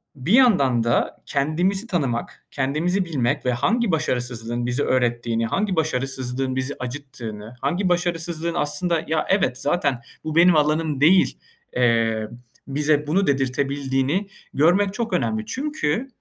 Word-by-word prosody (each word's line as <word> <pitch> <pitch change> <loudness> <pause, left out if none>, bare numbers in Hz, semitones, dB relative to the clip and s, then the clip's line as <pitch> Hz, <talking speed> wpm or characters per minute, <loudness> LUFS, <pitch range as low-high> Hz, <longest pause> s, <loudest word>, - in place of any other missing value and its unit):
bir 140 +7 -4
yandan 160 - +4
da 115 0 0
kendimizi 175 +9 0
tanımak, 135 - -2
kendimizi 155 +8 0
bilmek 135 -9 -1
ve 125 - +2
hangi 200 - +1
başarısızlığın 120 -5 -2
bize 125 +4 0
öğrettiğini, 120 -2 0
hangi 195 - -1
başarısızlığın 135 -4 -2
bizi 130 +2 -2
acıttığını, 125 -4 -7
hangi 175 +8 0
başarısızlığın 170 -1 -1
aslında 165 +2 0
ya 160 0 0
evet, 190 -10 +2
zaten 140 -4 0 0.2
bu 155 -1 -4
benim 170 +1 +6
alanım 150 -1 +1
değil, 180 +5 +4 0.4
eee, 115 -3 +2 0.4
bize 150 +1 +1
bunu 190 +6 +1
dedirtebildiğini 135 +5 0 0.3
görmek 190 +7 +3
çok 230 -3 -3
önemli. 110 -9 0
Çünkü, 265 - -2
145 Hz, 125 wpm, -22 LUFS, 125-175 Hz, 0.4 s, benim